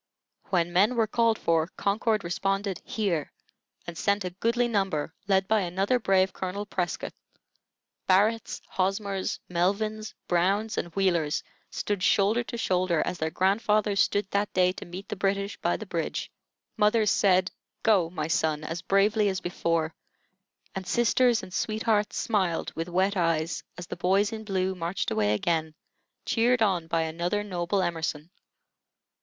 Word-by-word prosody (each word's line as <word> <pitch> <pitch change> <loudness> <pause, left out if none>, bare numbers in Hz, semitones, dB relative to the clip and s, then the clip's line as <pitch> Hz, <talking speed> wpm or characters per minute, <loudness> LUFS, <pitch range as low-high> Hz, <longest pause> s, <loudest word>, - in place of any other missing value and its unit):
When 175 -2 +1
men 205 +7 +4
were 230 -2 +3
called 225 0 +2
for, 165 -1 +1
Concord 215 +1 +1
responded 195 +2 -1
"Here!" 180 -9 -2 0.5
and 170 - -7
sent 200 +5 0
a 180 - -3
goodly 235 +6 +1
number, 195 -9 -1
led 190 -1 +2
by 220 0 +3
another 195 +7 0
brave 190 -3 +2
Colonel 190 +2 -4
Prescott. 180 -4 -3 1.0
Barretts, 210 +4 +2
Hosmers, 195 0 -1
Melvins, 215 +5 -1
Browns, 195 +5 +1
and - - -2
Wheelers 170 -6 +1 0.3
stood 205 -2 -3
shoulder 210 +5 +3
to 235 - -6
shoulder, 180 -6 +1
as 180 - -3
their 160 - 0
grandfathers 205 +3 +1
stood 205 +1 +2
that 200 +1 0
day 180 0 +4
to 185 - -9
meet 180 +3 -8
the - - -4
British 200 +1 -1
by - - 0
the - - -7
bridge. - - -3 0.5
Mothers 210 0 +3
said, 185 -1 +3 0.3
"Go 200 -8 +4
my 155 -3 -3
son," 155 -1 0
as 165 +2 -4
bravely 205 +2 +3
as 190 -1 -2
before, 165 -2 -1 0.8
and 190 -1 -5
sisters 240 +1 +3
and 185 -1 -10
sweethearts 215 0 0
smiled 190 -7 0
with 165 +2 -4
wet 190 +3 +1
eyes 165 -2 0 0.2
as 175 - -6
the - - -6
boys 195 +4 +2
in 220 -1 -6
blue 190 -2 0
marched 175 +1 -3
away 105 -1 +2
again, 160 +5 -1 0.5
cheered 240 0 +3
on 180 -6 +1
by 165 0 +1
another 175 +6 -1
noble 185 0 -1
Emerson. 165 -2 -3
190 Hz, 150 wpm, -27 LUFS, 175-210 Hz, 1.0 s, men